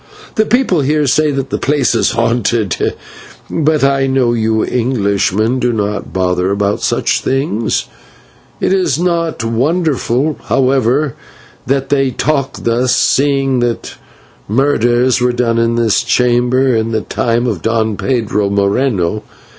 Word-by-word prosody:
The 220 -3 +1
people 230 - +2
here 150 +2 +1
say 155 +3 +2
that 135 -1 -3
the - - -1
place 140 -3 +1
is 115 - +1
haunted, 115 -3 0 0.6
but 155 -2 +1
I 135 0 +2
know 130 -3 +1
you 110 -1 0
Englishmen 110 -1 0
do 125 -1 +1
not 105 -2 -3
bother 90 0 0
about 100 +1 -1
such - - 0
things. 130 -5 -1 0.7
It - - +1
is 185 -8 +1
not 170 -6 -1
wonderful, 140 +2 0
however, 135 +1 +1 0.5
that 135 0 0
they 135 -2 +2
talk 140 +1 -2
thus, 120 +2 +1
seeing 135 -2 +1
that 120 -1 -2 0.5
murders 125 0 +2
were 125 0 +2
done 120 -1 0
in 115 0 +1
this 115 -2 +2
chamber 125 +2 +2
in 110 0 0
the 110 - 0
time 120 +2 -1
of 105 -9 -2
Don 110 0 0
Pedro 105 -4 -1
Moreno. 100 -1 0
125 Hz, 135 wpm, -14 LUFS, 110-135 Hz, 0.7 s, people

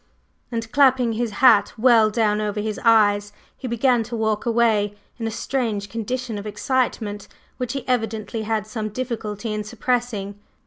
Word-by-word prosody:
And 230 -1 -4
clapping 260 -4 +4
his 235 +1 -1 0.2
hat 225 -5 +6
well 225 -2 +5
down 215 -1 +1
over 210 0 -2
his 215 0 -3
eyes, 205 -3 +4 0.2
he 260 - -7
began 240 +1 +2
to 235 +1 -5
walk 220 0 -1
away 220 -3 +2 0.2
in 225 - -2
a - - -1
strange 220 -3 -2
condition 230 +1 -3
of 205 - -7
excitement, 210 -2 -2 0.3
which 250 -1 -3
he 275 - -5
evidently 225 -3 -1
had 220 -1 -1
some 215 0 -4
difficulty 225 -2 -4
in 210 0 -3
suppressing. 215 -3 -2
225 Hz, 160 wpm, -22 LUFS, 210-240 Hz, 0.3 s, hat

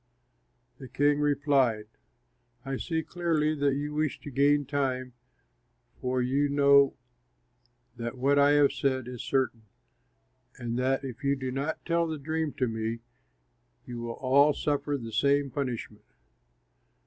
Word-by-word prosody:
The 130 - -9
king 145 +3 +2
replied, 140 -6 +2 0.8
"I 135 0 -3
see 160 +1 -2
clearly 160 -2 0
that 140 -2 +1
you 145 +1 -3
wish 155 0 -1
to 145 - -8
gain 145 +2 +3
time, 130 -2 -2 0.9
for 125 0 -1
you 140 +3 +1
know 140 -1 +5 1.0
that 120 +2 -5
what 140 +3 +3
I 140 +1 +5
have 145 -1 +5
said 130 -2 -1
is 125 -2 -6
certain, 125 -5 -1 0.9
and 120 -1 -4
that 130 +2 0
if 130 0 -7
you 140 0 +2
do 130 -1 -4
not 140 +4 -3
tell 170 0 +1
the 160 -1 -4
dream 155 +1 -2
to 130 - -1
me, 110 0 -3 0.8
you 120 -1 -7
will 115 0 -4
all 140 +4 +3
suffer 145 0 -1
the 115 -3 -8
same 140 +3 +2
punishment. 120 -6 -5
140 Hz, 140 wpm, -28 LUFS, 125-145 Hz, 1.0 s, know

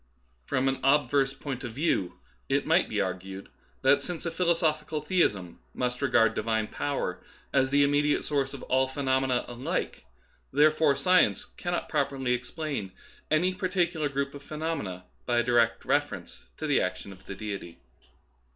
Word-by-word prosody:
From 130 +1 +1
an 135 0 0
obverse 140 0 +3
point 135 -3 -5
of 120 -3 -5
view 100 - 0 0.3
it - - +1
might - - +3
be - - -1
ar 95 -1 +1
gued 95 +1 -10 0.3
that 140 +1 +5
since 175 +3 -5
a 170 - -1
philosophical 165 -3 +1
theism 130 - 0 0.2
must 125 0 -2
regard 120 -5 +4
Divine 110 0 0
power 140 -10 -2 0.3
as 135 -1 +3
the 140 +1 +4
immediate 145 +1 +2
source 140 -2 -1
of 135 - -9
all 130 0 +2
phe 130 - -12
nomena 130 -2 +1
alike, 120 - -3 0.5
therefore 150 0 +4
science 180 +6 +3
cannot 175 -1 -2
properly 135 -4 0
explain 125 - -4 0.4
any 175 +5 +2
particular 180 -5 0
group 140 0 -2
of 145 - -9
phenomena 150 - -4 0.2
by 120 -1 +2
a 120 - +4
direct 120 -1 +2
reference - - -1
to 155 - -4
the 145 -2 +3
action 95 +2 -3
of 95 0 -13
Deity. 100 -4 -6
135 Hz, 155 wpm, -28 LUFS, 120-155 Hz, 0.5 s, that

